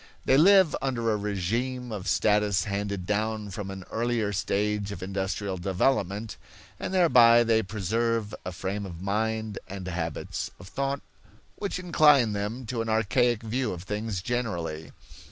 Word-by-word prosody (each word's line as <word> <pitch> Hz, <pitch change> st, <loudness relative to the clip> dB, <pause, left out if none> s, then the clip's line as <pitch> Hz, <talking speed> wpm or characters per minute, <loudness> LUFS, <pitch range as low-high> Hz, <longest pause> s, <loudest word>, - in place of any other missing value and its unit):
They 130 Hz, -, +4 dB
live 185 Hz, +1 st, +6 dB
under 115 Hz, -4 st, 0 dB
a -, -, +2 dB
regime 115 Hz, +5 st, -2 dB
of 105 Hz, -3 st, -5 dB
status 105 Hz, -3 st, +2 dB
handed 100 Hz, -2 st, -3 dB
down 105 Hz, +1 st, -1 dB
from 100 Hz, 0 st, -5 dB
an 95 Hz, -1 st, -7 dB
earlier 115 Hz, -3 st, 0 dB
stage 105 Hz, +1 st, -1 dB
of 90 Hz, -3 st, -6 dB
industrial 95 Hz, 0 st, -2 dB
development, 100 Hz, +3 st, 0 dB, 0.4 s
and -, -, -4 dB
thereby 120 Hz, -11 st, +6 dB
they 115 Hz, -1 st, +3 dB
preserve 110 Hz, +2 st, -1 dB
a 90 Hz, -, -4 dB
frame 95 Hz, +2 st, -4 dB
of 85 Hz, -3 st, -9 dB
mind 110 Hz, +1 st, -1 dB
and 95 Hz, -1 st, -7 dB
habits 85 Hz, -4 st, -3 dB
of 90 Hz, -, -11 dB
thought 140 Hz, +3 st, -2 dB, 0.6 s
which 200 Hz, -3 st, -3 dB
incline 150 Hz, -10 st, +4 dB
them 105 Hz, +5 st, -3 dB
to 120 Hz, 0 st, -2 dB
an 115 Hz, -, -3 dB
archaic 115 Hz, +2 st, +2 dB
view 115 Hz, +1 st, -1 dB
of 85 Hz, -1 st, -7 dB
things 105 Hz, -2 st, -3 dB
generally. 85 Hz, -10 st, -3 dB
105 Hz, 150 wpm, -27 LUFS, 100-120 Hz, 0.6 s, live